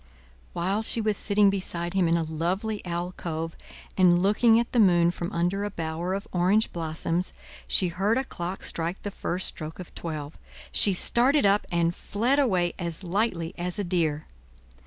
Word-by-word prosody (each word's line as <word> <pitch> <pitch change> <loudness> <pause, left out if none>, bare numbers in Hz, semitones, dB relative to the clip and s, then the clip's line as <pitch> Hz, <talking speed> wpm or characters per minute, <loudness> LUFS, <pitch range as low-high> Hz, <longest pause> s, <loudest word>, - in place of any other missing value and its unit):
While 190 +5 0
she 225 - +2
was 215 -1 +1
sitting 205 -1 +3
beside 175 -3 -3
him 190 -3 +2
in 165 +1 +3
a 165 - 0
lovely 180 +7 -2
alcove, 170 -2 -4 0.4
and 175 -2 +5
looking 225 +4 +4
at 235 - -2
the 245 - +2
moon 175 -4 +5
from 175 0 -5
under 175 +4 0
a 205 - -2
bower 170 0 -3
of 200 - -5
orange 185 +5 +2
blossoms, 165 +2 -2 0.4
she 185 - +4
heard 195 +7 +1
a 265 - +1
clock 180 -6 -6
strike 170 +3 -2
the 205 - -4
first 185 -1 -3
stroke 155 0 -7
of 180 - -10
twelve. 155 -3 -6 0.3
She 195 - +3
started 250 +8 +3
up, 200 +1 +3
and 170 0 +1
fled 240 +10 0
away 185 -10 +2
as 170 0 -4
lightly 180 -2 -1
as 180 0 -2
a 205 - -1
deer. 165 -5 0
180 Hz, 175 wpm, -26 LUFS, 170-205 Hz, 0.4 s, and